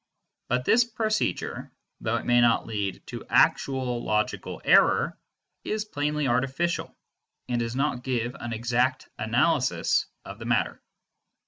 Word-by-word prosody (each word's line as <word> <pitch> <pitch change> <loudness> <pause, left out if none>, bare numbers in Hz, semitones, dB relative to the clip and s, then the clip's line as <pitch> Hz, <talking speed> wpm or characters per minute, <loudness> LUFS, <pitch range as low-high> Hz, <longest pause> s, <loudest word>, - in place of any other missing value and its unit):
But 125 +1 0
this 240 +2 +5
procedure, 220 -2 -2 0.3
though - - -1
it - - -3
may 120 0 +4
not 120 -1 +3
lead 100 -3 -3
to - - -7
actual 130 -3 +2
logical 105 0 -1
error, - - +4 0.5
is 215 0 -2
plainly 150 -5 -1
artificial, 135 +7 -1 0.5
and 120 -1 -1
does 115 0 -2
not 135 -2 0
give 125 -2 -2
an 120 -1 -5
exact 125 +3 0
analysis - - +1 0.2
of 100 +2 -9
the 115 - -7
matter. 120 -1 0
125 Hz, 130 wpm, -26 LUFS, 120-145 Hz, 0.5 s, this